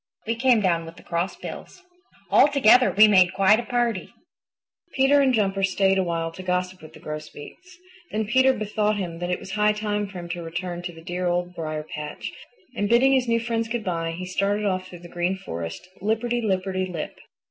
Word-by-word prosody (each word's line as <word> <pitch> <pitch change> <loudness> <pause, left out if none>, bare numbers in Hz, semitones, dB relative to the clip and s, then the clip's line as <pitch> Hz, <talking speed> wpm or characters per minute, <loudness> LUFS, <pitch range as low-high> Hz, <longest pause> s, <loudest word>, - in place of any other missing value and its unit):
We 225 - 0
came 240 -1 +3
down 170 -4 +1
with 165 - -10
the - - -15
Crossbills. 180 - -5 0.5
All - - +7
together 255 -3 +5
we 215 +2 +7
made 185 -3 +5
quite 195 +3 +5
a - - -3
party." 240 -4 -1 0.8
Peter 270 +2 +4
and 270 -1 +3
Jumper 195 -4 +1
stayed 195 0 +2
a - - +2
while 165 -1 -2
to 175 - -9
gossip 180 0 -2
with 155 - -13
the - - -13
Grosbeaks. 155 - -9 0.3
Then 220 0 -2
Peter 260 +5 +4
bethought 215 -2 -1
him 170 -4 -4
that 175 0 -3
it 180 - 0
was 190 - -9
high 210 +1 +2
time 210 -1 -2
for 195 -1 -10
him 175 -1 -7
to 175 0 -4
return 175 +1 -5
to 175 0 -5
the 165 -1 -14
dear 180 +1 -3
Old 175 0 -1
Briar 155 -3 -4
patch, 150 0 -6 0.4
and 205 -3 -1
bidding 255 +4 +5
his 255 -2 +2
new 230 0 +2
friends 230 -1 -2
good 230 -1 -3
by, 165 -3 -2
he 180 +2 -6
started 200 +3 0
off 185 -2 -1
through 175 -2 -12
the - - -9
Green 175 +2 -1
Forest, 85 - -6
lipperty 230 +4 0
lipperty 185 -2 -1
lip. 165 -3 -6
190 Hz, 205 wpm, -24 LUFS, 175-220 Hz, 0.8 s, All